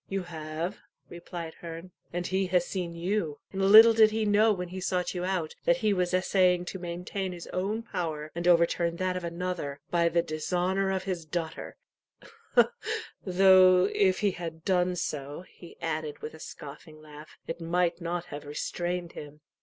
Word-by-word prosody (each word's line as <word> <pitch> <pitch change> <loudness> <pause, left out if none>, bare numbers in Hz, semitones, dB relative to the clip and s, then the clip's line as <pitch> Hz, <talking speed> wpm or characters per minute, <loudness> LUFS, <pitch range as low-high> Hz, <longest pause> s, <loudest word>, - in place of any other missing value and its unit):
"You 195 -1 -2
have," 160 +2 -5 0.3
replied 170 -1 -7
Herne; 170 +2 -8 0.2
"and 175 0 -3
he 190 +1 0
has 180 -1 +2
seen 175 -3 -4
you 170 -3 -2 0.2
and 195 - -2
little 220 +4 +9
did 220 -1 +6
he 220 0 -1
know 210 +2 +4
when 180 -3 -3
he 185 +1 -6
sought 180 -1 -1
you 180 -1 -3
out, 180 -4 -2
that 255 - +4
he 210 - +4
was 180 -2 0
essaying 185 -1 +2
to 190 - -6
maintain 180 +2 -4
his 170 -1 -8
own 205 +5 -1
power, 155 -7 -4
and 170 +1 -3
overturn 170 0 +3
that 185 +1 -1
of 180 - -4
another, 170 -4 -4
by 170 -1 +3
the 170 0 +2
dishonour 180 +5 -1
of 190 -1 -1
his 185 -3 -3
daughter 160 0 -5 1.5
though 185 0 +6
if 190 -2 +2
he 205 -2 +3
had 165 -2 -7
done 180 -2 +2
so," 150 -3 -4
he 170 - -15
added, 155 -2 -3
with 155 - -6
a 160 - -12
scoffing 155 +1 -10
laugh, 150 0 -13
"it 165 - -6
might 175 +1 0
not 170 +1 -3
have 145 -4 -8
restrained 175 +3 -3
him." 150 0 -10
175 Hz, 175 wpm, -28 LUFS, 165-185 Hz, 1.5 s, little